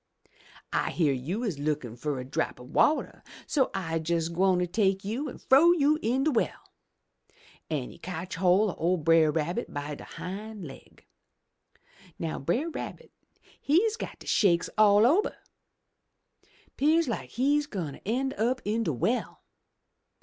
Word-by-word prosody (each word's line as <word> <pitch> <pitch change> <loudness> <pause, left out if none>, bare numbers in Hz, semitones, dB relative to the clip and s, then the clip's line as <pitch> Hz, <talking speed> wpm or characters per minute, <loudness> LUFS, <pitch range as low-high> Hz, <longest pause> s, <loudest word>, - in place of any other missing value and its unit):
I - - +1
hear 150 -5 +1
you 165 - -3
is 190 - -2
lookin' 145 -6 -2
fur 135 +2 -3
a 125 - -6
drop 130 -1 -2
o' 125 - -11
wateh, 300 - +1 0.2
so 275 -4 +1
I'se 165 -3 -2
jes' 165 -1 +1
gwine 180 +1 +2
take 195 0 +1
you 250 +8 -3
an' - - -9
frow 315 +6 +5
you 305 -2 +2
in 255 +4 +1
de 310 - +2
well!' 235 - -2 1.0
An' 145 -6 -3
he - - -15
cotch 180 0 -6
hoi' 185 +2 +3
o' 180 +3 +2
Brer 165 0 +4
Rabbit 165 +9 -2
by 145 +1 -4
de - - -9
hind 205 +1 -7
laig. 135 - -13 1.1
Now 165 -2 -3
Brer 245 - -1
Rabbit - - -7 0.5
he's 400 +10 +2
got - - -7
de - - -14
shakes 175 -6 +2
all 210 0 +6
ober! 340 - +2 1.4
'Pears 315 +3 +3
like 235 - -3
he's 290 +4 +1
gwine 175 - -4
ter - - -13
en' 265 +6 -1
up 245 +4 +1
in 215 +3 0
de 160 - -1
well. 225 - -2
195 Hz, 155 wpm, -28 LUFS, 160-255 Hz, 1.4 s, all